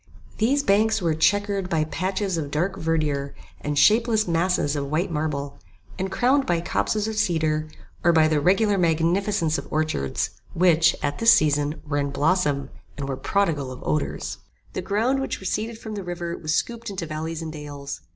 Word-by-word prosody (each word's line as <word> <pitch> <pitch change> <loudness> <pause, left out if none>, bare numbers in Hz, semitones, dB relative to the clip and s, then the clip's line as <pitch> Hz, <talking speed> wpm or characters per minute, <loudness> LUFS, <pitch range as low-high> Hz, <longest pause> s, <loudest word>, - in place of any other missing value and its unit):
These 270 +6 +2
banks 215 +1 +3
were 170 -4 +1
chequered 200 +3 +1
by 160 -3 +1
patches 190 +4 -2
of 155 -3 -3
dark 170 +7 -1
verdure 150 -4 -1 0.2
and 145 0 -3
shapeless 220 +6 +4
masses 170 -3 +1
of 140 -1 -3
white 170 +5 0
marble, 145 -2 -3 0.4
and 190 +1 -2
crowned 265 +5 +2
by 175 -1 +2
copses 210 +5 -1
of 220 -1 -4
cedar, 155 -5 +1 0.3
or 170 - +5
by 160 -2 +5
the 155 -2 +1
regular 195 +4 +3
magnificence 170 +1 +1
of - - -10
orchards, 155 - -1 0.2
which, 165 -2 +4
at 145 0 -1
this 230 0 +7
season, 150 0 +1
were 145 -1 0
in 140 0 -1
blossom, 145 -2 +1 0.3
and 140 -1 -4
were 135 - -2
prodigal 145 -2 0
of 130 - -9
odours. 155 - -2 0.3
The - - -3
ground 235 +7 +1
which 270 - -3
receded 215 +4 -3
from 220 -1 -7
the 200 -2 -4
river 175 -1 -4
was 155 0 -2
scooped 235 -1 -2
into 190 -4 -4
valleys 160 +1 -4
and 160 -1 -6
dales. 145 -2 -7
165 Hz, 175 wpm, -24 LUFS, 150-200 Hz, 0.4 s, this